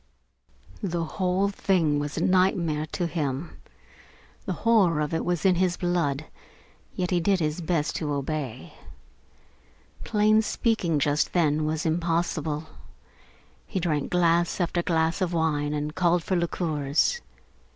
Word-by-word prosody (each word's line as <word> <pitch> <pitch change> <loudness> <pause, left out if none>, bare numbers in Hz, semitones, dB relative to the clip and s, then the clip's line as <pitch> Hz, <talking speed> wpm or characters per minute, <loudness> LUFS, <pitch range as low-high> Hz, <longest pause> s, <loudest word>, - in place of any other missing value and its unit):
The 175 -4 -1
whole 185 +3 0
thing 170 -7 +1
was 145 0 -4
a - - 0
nightmare 175 -5 +2
to 175 +3 -3
him. 155 -2 -3 0.9
The 190 - 0
horror 195 -9 +4
of 150 +1 -1
it 160 - 0
was 175 +1 -1
in 190 - +6
his 180 -1 +1
blood, 165 -5 0 0.7
yet 180 0 -2
he 180 - +3
did 190 +2 +2
his 155 +1 -1
best 160 -2 -1
to 150 -2 -3
obey. 140 -3 -4 1.3
Plain 215 0 +3
speaking 215 -7 0
just 145 +1 +1
then 155 -3 +2
was 155 0 -2
impossible. 165 -2 -1 1.0
He 190 - -2
drank 155 -5 -1
glass 170 0 +2
after 175 0 0
glass 165 +1 0
of 180 -2 0
wine 150 -3 0
and 150 +1 -3
called 175 -1 +2
for 190 - -1
liqueurs. 165 - 0
170 Hz, 135 wpm, -26 LUFS, 150-180 Hz, 1.3 s, in